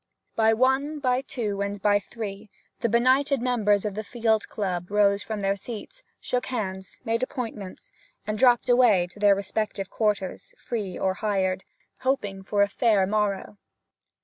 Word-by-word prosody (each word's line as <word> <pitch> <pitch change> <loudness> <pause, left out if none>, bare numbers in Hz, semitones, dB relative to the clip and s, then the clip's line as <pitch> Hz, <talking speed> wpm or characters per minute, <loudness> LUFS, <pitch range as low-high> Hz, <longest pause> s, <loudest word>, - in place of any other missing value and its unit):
By 220 0 +4
one, 265 +5 +2
by 255 -3 +1
two, 220 -7 -3
and 200 0 -2
by 205 +1 +3
three 205 0 -7 0.3
the 235 - 0
benighted 260 +4 +3
members 220 -5 +2
of 210 - -2
the 215 +2 -4
Field 220 -1 0
Club 180 -4 -3
rose 200 -1 +3
from 215 -1 -4
their 195 0 +1
seats, 240 - -8 0.2
shook 250 0 -2
hands, 190 -6 -4
made 230 +1 0
appointments, 245 - -5 0.3
and 215 0 -2
dropped 245 +1 +4
away 240 -7 +5
to 205 - -13
their 205 -1 +5
respective 200 0 -3
quarters, 210 -4 -2
free 205 -7 -4
or 190 -1 +1
hired, 190 -2 -1 0.3
hoping 205 -8 -1
for 200 +1 +2
a - - +2
fair 205 -1 +2
morrow. 205 0 -1
210 Hz, 155 wpm, -26 LUFS, 200-245 Hz, 0.3 s, away